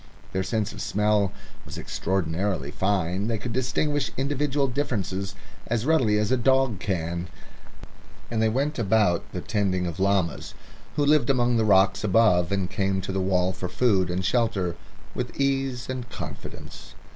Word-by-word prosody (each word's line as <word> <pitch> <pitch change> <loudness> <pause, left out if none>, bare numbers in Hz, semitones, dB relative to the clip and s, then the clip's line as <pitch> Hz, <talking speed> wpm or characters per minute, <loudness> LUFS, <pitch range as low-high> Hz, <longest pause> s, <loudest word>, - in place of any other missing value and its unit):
Their 95 - 0
sense 105 +2 -1
of - - -7
smell 105 -1 +1 0.3
was - - -9
extraordinarily 90 -4 -2
fine; 95 +1 0
they 115 -1 0
could 115 +2 -5
distinguish 140 +3 0
individual 140 +1 0
differences 100 -8 -2 0.3
as 115 0 -1
readily 130 -9 +3
as 105 +2 0
a 130 - +4
dog 130 -4 +2
can, 85 -3 -2 1.0
and 115 -1 0
they 110 - +3
went 140 +5 -1
about 105 -5 +2
the - - -4
tending 95 -3 0
of 85 -3 -4
the - - -4
llamas, 95 -5 0 0.4
who 145 -1 +2
lived 145 -3 +4
among 120 -3 +3
the 110 - +2
rocks 95 -1 +4
above 95 -4 +4
and 95 -2 0
came 95 -1 0
to 95 - -4
the 95 0 -1
wall 95 0 +1
for 90 -1 -5
food 95 -2 +2
and 90 +1 -2
shelter, 100 -5 +1 0.4
with - - -5
ease 135 -3 0
and 125 -2 -5
confidence. - - -9
105 Hz, 160 wpm, -25 LUFS, 95-125 Hz, 1.0 s, a